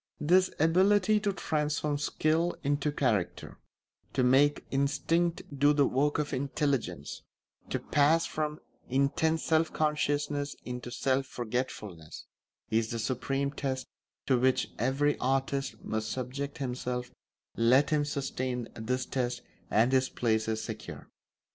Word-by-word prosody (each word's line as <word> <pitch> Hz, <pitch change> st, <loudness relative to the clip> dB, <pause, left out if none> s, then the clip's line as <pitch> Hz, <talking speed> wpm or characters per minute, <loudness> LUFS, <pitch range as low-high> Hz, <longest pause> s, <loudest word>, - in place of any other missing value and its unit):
This 185 Hz, +5 st, +4 dB
ability 190 Hz, +6 st, +4 dB
to 205 Hz, -1 st, 0 dB
transform 150 Hz, -4 st, -1 dB
skill 160 Hz, +3 st, +1 dB
into 145 Hz, +1 st, +1 dB
character, 115 Hz, -10 st, -1 dB, 0.5 s
to 130 Hz, -, +2 dB
make 135 Hz, +4 st, +4 dB
instinct 150 Hz, +5 st, +1 dB
do 145 Hz, +2 st, +4 dB
the 145 Hz, -1 st, +4 dB
work 145 Hz, +3 st, +1 dB
of 150 Hz, 0 st, -2 dB
intelligence, 135 Hz, -, -2 dB, 0.5 s
to -, -, 0 dB
pass 150 Hz, +3 st, +3 dB
from 150 Hz, 0 st, -3 dB, 0.3 s
intense 140 Hz, +5 st, +1 dB
self 160 Hz, 0 st, +2 dB
consciousness 145 Hz, -1 st, 0 dB
into 125 Hz, 0 st, -5 dB
self 130 Hz, +2 st, 0 dB
forgetfulness, 110 Hz, -10 st, -5 dB, 0.5 s
is 110 Hz, 0 st, +1 dB
the 115 Hz, -, -3 dB
supreme 135 Hz, +4 st, -1 dB
test 130 Hz, -2 st, -3 dB, 0.4 s
to 130 Hz, -3 st, +3 dB
which 130 Hz, +1 st, +2 dB
every 135 Hz, +5 st, +1 dB
artist 135 Hz, -2 st, -1 dB
must 110 Hz, 0 st, -2 dB
subject 135 Hz, +3 st, -4 dB
himself 125 Hz, -2 st, -3 dB, 0.4 s
let 125 Hz, +6 st, +4 dB
him 150 Hz, -1 st, +3 dB
sustain 130 Hz, -4 st, -3 dB
this 125 Hz, +3 st, -2 dB
test 125 Hz, -2 st, -2 dB, 0.3 s
and 115 Hz, +4 st, +3 dB
his 130 Hz, -1 st, +3 dB
place 110 Hz, -2 st, 0 dB
is 110 Hz, 0 st, -1 dB
secure. 110 Hz, -1 st, -8 dB
135 Hz, 125 wpm, -30 LUFS, 125-150 Hz, 0.5 s, This